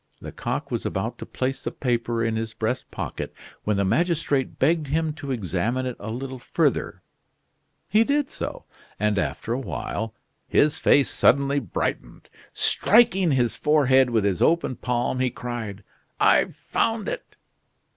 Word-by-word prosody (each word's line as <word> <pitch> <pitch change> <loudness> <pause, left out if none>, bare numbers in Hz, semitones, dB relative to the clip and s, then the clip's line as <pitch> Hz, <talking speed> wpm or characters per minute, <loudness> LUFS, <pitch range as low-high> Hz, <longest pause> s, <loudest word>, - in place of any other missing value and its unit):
Lecoq - - -4
was - - -2
about - - -3
to - - -7
place 130 +1 -3
the - - -1
paper 120 -2 -1
in 115 -1 0
his 110 0 -4
breast 115 +4 -2
pocket, - - -5 0.3
when 105 -1 +1
the 100 - +2
magistrate 145 - +1
begged 155 +2 +2
him 155 +2 0
to 145 -2 -8
examine 115 +2 -1
it 125 -2 -3
a 105 - -6
little 130 +3 -5
further. - - -1 0.8
He 215 +2 +4
did 285 +3 +1
so; - - -6 0.3
and 105 -1 +1
after 90 +7 -2
a 125 - -1
while 110 -2 -4 0.3
his 150 +2 +3
face 140 - +4
suddenly 140 0 +3
brightened. 125 - -4 0.2
Striking 195 -7 +4
his 120 -3 +2
forehead 135 -4 +4
with 115 -3 +1
his 95 -4 0
open 165 -6 +2
palm, 125 +1 -1
he 130 0 +2
cried: 115 -5 -6 0.4
"I've - - +4
found 225 -2 -1
it!" - - -5
130 Hz, 150 wpm, -24 LUFS, 115-150 Hz, 0.8 s, He